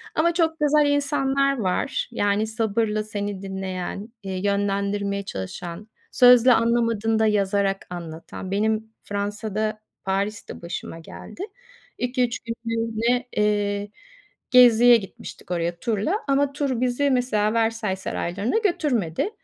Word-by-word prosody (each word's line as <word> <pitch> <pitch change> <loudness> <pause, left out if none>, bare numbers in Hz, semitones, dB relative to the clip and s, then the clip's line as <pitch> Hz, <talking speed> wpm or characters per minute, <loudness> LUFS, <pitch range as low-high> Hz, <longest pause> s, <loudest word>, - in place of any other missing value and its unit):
ama 340 +2 +3
çok 320 -2 +1
güzel 295 0 +4
insanlar 275 -1 +1
var. 190 +7 -1
Yani 205 -1 +1
sabırla 220 -1 0
seni 205 -2 -4
dinleyen, 190 +2 -5
iii, 190 0 -4
yönlendirmeye 200 0 0
çalışan, 170 - -6 0.2
sözle 250 0 +7
anlamadığında 230 -1 +2
yazarak 200 -1 +1
anlatan. 170 +2 -7
Benim 220 +2 0
Fransa'da 210 +1 -3 0.2
Paris'te 200 +1 -3
başıma 170 -1 -6
geldi. 165 - -10 0.6
2-3 245 -1 0
günlüğüne, 230 +1 -1
eee, 205 -1 +1 0.6
geziye 245 -1 +7
gitmiştik 195 -3 -10
oraya 170 0 -1
turla 225 - 0
ama 280 0 +2
tur 275 -4 -1
bizi, 255 +3 +1
mesela, 215 -4 +1
Versailles 225 -4 0
saraylarına 200 - -2
götürmedi. 300 - 0
215 Hz, 110 wpm, -24 LUFS, 200-245 Hz, 0.6 s, sözle